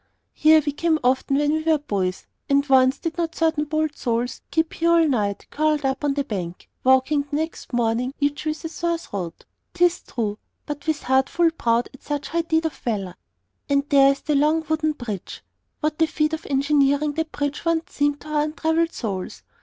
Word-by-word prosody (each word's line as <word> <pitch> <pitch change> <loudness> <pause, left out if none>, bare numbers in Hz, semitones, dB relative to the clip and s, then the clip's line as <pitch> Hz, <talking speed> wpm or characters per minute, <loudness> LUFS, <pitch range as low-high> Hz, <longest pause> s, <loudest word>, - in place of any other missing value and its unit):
Here 310 0 +5
we 290 - +1
came 320 +2 +1
often, 260 +2 +2
when 295 0 +2
we 315 +1 0
were 320 0 +3
boys; 195 -10 -2 0.2
and 280 0 +3
once 260 0 +5
did 330 0 -4
not 330 -1 -1
certain 320 -2 +1
bold 310 0 -1
souls 240 0 -2
sleep 320 0 0
here 335 +1 +1
all 335 -1 +5
night, 210 -7 -1
curled 305 -1 +1
up 265 +2 -1
along 285 -1 +1
the 285 - 0
bank, 180 -7 -5 0.2
waking 265 +3 +3
the 290 - -3
next 320 +2 -4
morning, 240 +1 0
each 290 +1 -1
with 310 +2 -3
a - - 0
sore 340 +1 -1
throat, 195 - -7 0.3
'tis 355 0 +3
true, 215 -4 -3 0.3
but 295 0 -6
with 310 -2 -1
heart 265 +1 +2
full 340 -1 +3
proud 235 -6 +1
at 270 - -15
such 290 -1 -4
high 335 +1 +1
deed 325 0 0
of 320 - -1
valor! 200 -6 -3 0.6
And 280 0 +2
there 275 -1 +6
is 275 - -4
the 305 - -1
long 305 +3 +2
wooden 310 0 +1
bridge. 220 -9 -7 0.4
What 305 +1 -1
a 320 - +5
feat 305 0 0
of 320 - -4
engineering 285 +1 +2
that 320 +1 -3
bridge 285 0 -3
once 335 +1 -1
seemed 290 0 0
to 305 - -11
our 300 -1 +1
untraveled 320 +2 0
souls! 195 -6 -5
290 Hz, 200 wpm, -23 LUFS, 260-315 Hz, 0.6 s, there